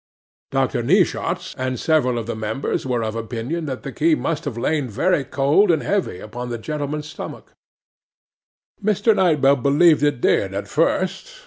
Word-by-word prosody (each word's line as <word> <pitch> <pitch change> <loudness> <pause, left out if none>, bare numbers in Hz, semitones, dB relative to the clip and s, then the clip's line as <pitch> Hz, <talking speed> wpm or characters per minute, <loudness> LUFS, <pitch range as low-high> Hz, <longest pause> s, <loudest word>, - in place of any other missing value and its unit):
'DR. - - 0
NEESHAWTS - - +1
and 130 -1 -2
several 145 -7 +2
of 115 - -3
the 120 - -4
members 110 +5 -3
were 120 -3 0
of 110 0 -3
opinion 120 +8 -4
that 130 -2 -5
the - - -5
key 330 -1 +2
must 165 - -3
have 135 -5 -4
lain 145 +1 -1
very 140 - +1
cold 140 +10 +2
and 160 -3 +2
heavy 195 - -1
upon 120 +4 -7
the 120 - -3
gentleman's 150 +4 -4
stomach. - - -9 1.3
'MR. 210 +1 +3
KNIGHT 170 -7 +2
BELL 140 +1 +5
believed 145 +5 +4
it 145 -4 +1
did 95 -4 +1
at 100 - -4
first. 185 - 0
140 Hz, 165 wpm, -21 LUFS, 120-165 Hz, 1.3 s, BELL